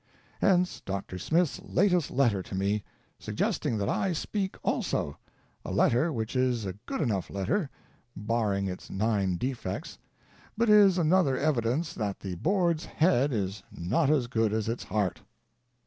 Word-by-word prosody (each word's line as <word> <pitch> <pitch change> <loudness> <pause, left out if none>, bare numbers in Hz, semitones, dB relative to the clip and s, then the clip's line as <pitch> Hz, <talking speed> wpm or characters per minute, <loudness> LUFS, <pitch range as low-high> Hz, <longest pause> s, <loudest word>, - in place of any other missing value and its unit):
Hence 180 -2 +2
Dr. 95 -1 -4
Smith's 165 - +1
latest 180 -4 +2
letter 120 -8 +2
to 95 - -7
me, 100 +2 0 0.4
suggesting 115 - -1
that 100 -1 -1
I 190 -2 0
speak 190 +4 -3
also 70 - -1 0.2
— - - -38
a - - -5
letter 125 +8 +3
which 110 -3 -3
is 125 -4 +1
a 95 - -3
good - - -2
enough 105 - -1
letter, 135 - -1 0.5
barring 105 -2 0
its 90 -1 -6
nine 100 -2 0
defects, 130 +4 -4 0.6
but 230 -1 +3
is 200 -3 +7
another 165 -4 +3
evi 145 -5 +1
dence 150 +9 -1
that 105 - -3
the 95 -2 -4
Board's 170 - +1
head 145 -4 +2
is 100 -3 -2
not 135 - 0
as 145 -5 +3
good 115 -3 0
as 110 -1 -1
its 115 +2 -3
heart. 105 -4 -1
120 Hz, 155 wpm, -28 LUFS, 100-165 Hz, 0.6 s, is